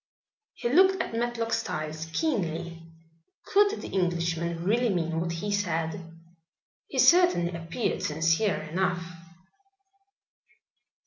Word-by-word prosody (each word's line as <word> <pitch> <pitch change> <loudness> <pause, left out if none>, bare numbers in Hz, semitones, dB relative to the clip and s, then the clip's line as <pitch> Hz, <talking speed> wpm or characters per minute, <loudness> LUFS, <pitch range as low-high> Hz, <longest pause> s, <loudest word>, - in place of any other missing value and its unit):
He 240 - -3
looked 375 +8 +4
at - - -3
Matlock 230 0 -2
Styles 155 -7 -3
keenly. 170 - -2 0.6
Could 410 +1 +3
the - - -6
Englishman 170 -2 -1
really 235 +6 +2
mean 165 -4 -1
what 170 0 -2
he 170 +5 -3
said? 165 -4 -2 0.7
He - - -7
certainly 350 - +5
appeared 170 +7 -3
sincere 165 +6 +1
enough. 180 +3 -1
175 Hz, 105 wpm, -27 LUFS, 165-230 Hz, 0.7 s, certainly